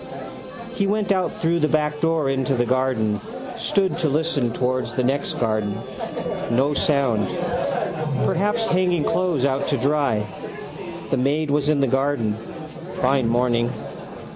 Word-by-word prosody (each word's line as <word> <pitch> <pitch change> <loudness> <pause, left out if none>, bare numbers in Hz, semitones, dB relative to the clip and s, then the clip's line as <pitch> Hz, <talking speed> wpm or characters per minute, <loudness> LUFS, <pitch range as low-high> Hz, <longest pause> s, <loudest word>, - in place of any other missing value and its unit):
He 200 -5 0
went 210 0 +1
out 185 -2 0
through 170 +1 +3
the 155 - +3
backdoor 155 0 +1
into 135 0 0
the 120 0 +2
garden: 125 -4 +1 0.3
stood 200 -5 +1
to 160 - +2
listen 145 -4 +1
towards 130 +2 -1
the 130 - +1
next 135 +3 0
garden. 110 -3 0 0.7
No 135 +5 +2
sound. 135 -9 +2 1.0
Perhaps 210 +5 +1
hanging 180 -5 +2
clothes 170 -8 +1
out 140 0 0
to - - +1
dry. 140 -7 +1 0.9
The 135 - +2
maid 145 +4 +1
was 145 0 +2
in 150 -2 +3
the - - +4
garden. 135 -4 +1 0.6
Fine 130 -1 +2
morning. 120 0 +2
140 Hz, 135 wpm, -23 LUFS, 125-160 Hz, 1.0 s, the